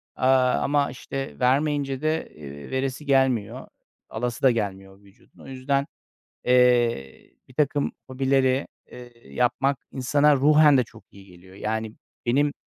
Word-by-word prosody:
aaa, 130 -1 +3
ama, 145 0 +1
işte, 135 +1 -7
vermeyince 140 +1 0
de, 155 +1 -1
eee, 70 -1 -10
veresi 130 +2 -3
gelmiyor. 130 -6 +1 0.4
Alası 120 +1 -4
da 130 - +6
gelmiyor 95 -3 -4
vücudun. 100 0 -24
O - - -13
yüzden, 135 +1 -1 0.6
eee, 120 - +2 0.2
birtakım 145 +2 -1
hobileri, 130 0 +1 0.3
eee, 120 -1 -14
yapmak 135 +2 0
insana 145 +3 +3
ruhen 150 +1 +5
de 125 - +2
çok - - -17
iyi 100 0 -15
geliyor. 90 0 -17
Yani, 110 +1 -3 0.3
benim 145 +4 +2
130 Hz, 130 wpm, -24 LUFS, 115-140 Hz, 0.6 s, da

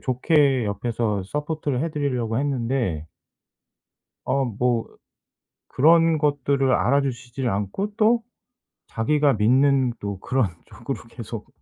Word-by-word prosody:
좋게 135 -1 +2
옆에서 105 0 -2
서포트를 150 - -3
해 165 - -2
드리려고 125 -7 -1
했는데 120 - -1 1.2
어 135 0 0
뭐 120 0 -1 0.8
그런 165 +3 +4
것들을 140 -2 +1
알아 140 +3 +3
주시질 125 -1 -3
않고 105 - -3
또 230 +2 +3 0.7
자기가 145 +5 +1
믿는 130 +3 +3
또 100 -2 -5
그런 125 -2 0 0.2
쪽으로 - - -7
계속 - - -8
130 Hz, 230 characters per minute, -23 LUFS, 115-145 Hz, 1.2 s, 그런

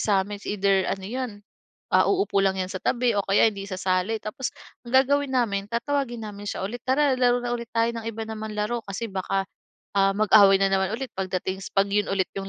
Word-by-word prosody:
sa'min, 205 0 +1
it's - - -13
either 195 -2 +2
ano 195 -1 -3
'yon, 250 +4 -3 0.6
ah, - - +4
uupo 390 - +1
lang 190 0 +2
'yan 185 0 -3
sa 185 - -4
tabi 245 +2 +1
o - - +2
kaya 205 +3 +4
hindi 200 -1 -7
isasali 185 +3 -1
tapos 225 +4 -4 0.3
ang 240 - -7
gagawin 275 +1 +3
namin, 200 -5 0
tatawagin 240 0 -2
namin 205 -1 -8
siya - - -3
ulit, 230 +5 -4
"Tara 270 +1 +3
laro 245 -1 +3
na 240 - -3
ulit 235 -1 -3
tayo 230 +1 +2
ng 225 - -8
iba 225 0 -4
naman 220 -1 -6
laro," 220 +3 -2
kasi 200 +4 -4
baka, 195 0 -1 0.5
ah, 195 0 +4
mag-away 205 -2 +6
na 195 - +3
naman 190 0 +1
ulit 260 +2 -5
pagdating 190 0 -3
s - - -7
'pag 195 0 +4
'yon 205 +1 +1
ulit 195 -1 +1
yung 195 0 -5
210 Hz, 215 wpm, -25 LUFS, 195-240 Hz, 0.6 s, mag-away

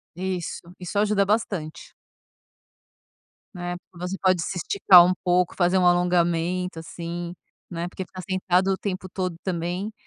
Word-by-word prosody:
Isso. 185 -1 -3 0.2
Isso 185 +3 -2
ajuda 205 -1 +2
bastante. 195 -7 -2 1.6
Né? 175 0 -4 0.2
Você 180 +2 -5
pode 185 -2 +3
se 180 - -3
esticar 180 0 +6
um 185 - +2
pouco, 180 -1 +2
fazer 180 +1 +2
um 185 - +3
alongamento 175 0 +1
assim, 170 +1 -6 0.4
né? 170 0 -4
Porque 190 - -6
ficar 185 +1 -9
sentado 185 0 +1
o 190 - 0
tempo 185 -2 -4
todo 185 -1 -3
também 180 +3 -3
180 Hz, 135 wpm, -24 LUFS, 175-190 Hz, 1.6 s, esticar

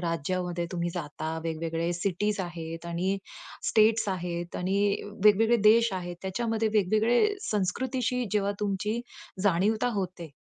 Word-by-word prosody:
राज्यामध्ये 175 +1 -2
तुम्ही 175 -1 -1
जाता, 160 -1 -4
वेगवेगळे 165 +1 -2
सिटीज 200 +4 -1
आहेत 165 -2 -6
आणि 180 +3 -1 0.5
स्टेट्स 220 -1 +4
आहेत 175 -2 -3
आणि 185 +2 0 0.5
वेगवेगळे 220 +3 +6
देश 230 0 +4
आहेत. 175 -2 -4
त्याच्यामध्ये 220 +3 -1
वेगवेगळे 220 - +3 0.2
संस्कृतीशी 250 +4 0
जेव्हा 200 -1 +1
तुमची 210 +3 -1 0.4
जाणीवता 205 +5 +2
होते, 180 -4 -4
190 Hz, 115 wpm, -28 LUFS, 175-215 Hz, 0.5 s, वेगवेगळे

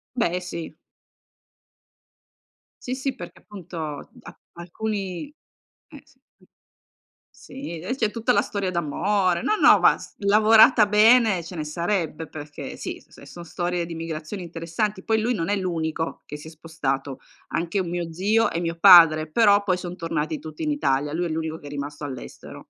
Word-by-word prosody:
Beh, 180 -7 0
sì. 170 -2 -7 2.1
Sì, 255 - -4
sì 265 0 -3
perché - - -10
appunto 165 -7 -8
ap - - -13 0.2
alcuni 195 - -5 0.6
eh - - -13
sì. - - -27 1.2
Sì, 260 - -8
des 245 +10 -4
c'è 215 -2 0
tutta 230 -1 -2
la 205 - +3
storia 200 -3 -3
d'amore. 180 +2 0
No, 430 - +1
no, - - +6
vas - - +2
lavorata 215 +2 +6
bene 215 -2 +4
ce 170 +2 -9
ne 155 - -3
sarebbe 165 -1 -2
perché 145 -1 -8
sì, - - -6
s - - -20
è - - -13
s 140 - -14
son 175 -1 -9
storie 175 0 -3
di 165 -1 -7
migrazioni 165 +3 -6
interessanti, 170 +5 -3
poi 220 -1 +1
lui 240 +3 0
non 165 -3 -3
è 205 - +1
l'unico 165 -3 -3
che 150 - -7
si 150 - -12
è - - -9
spostato, 145 -4 -4 0.3
anche 170 +4 -2
un 175 - -3
mio 170 -1 -4
zio 210 +6 +1
e 165 - -2
mio 170 -1 -3
padre, 165 -4 +8
però 205 +2 +4
poi 185 -2 +1
son 180 0 -7
tornati 165 -2 -3
tutti 155 -1 -9
in 305 - -1
Italia. 145 - 0
Lui 175 +2 -1
è - - -2
l'unico 160 0 -3
che 145 - -14
è - - -8
rimasto 145 +1 -6
all'estero. 130 -3 -9
175 Hz, 170 wpm, -24 LUFS, 160-205 Hz, 2.1 s, padre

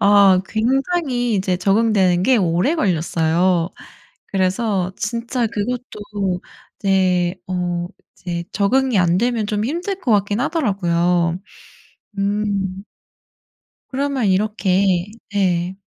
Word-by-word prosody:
어 200 -2 +6
굉장히 250 - 0
이제 185 -2 0
적응되는 195 -2 +2
게 255 +5 +4
오래 180 - +1
걸렸어요. 170 - +1 0.6
그래서 190 -1 0
진짜 235 +2 -2
그것도 205 -4 -3 0.4
이제 185 -3 +2
어 175 -1 -2 0.3
이제 170 -2 -5
적응이 250 +3 +2
안 175 -1 +3
되면 235 -2 0
좀 210 0 -1
힘들 350 - -3
것 245 -10 +1
같긴 205 +1 +1
하더라고요. 180 - +1 0.8
음. 200 -1 -1 1.1
그러면 275 -3 -1
이렇게 190 -2 +1 0.3
네. 185 -2 0
200 Hz, 205 characters per minute, -20 LUFS, 180-230 Hz, 1.1 s, 어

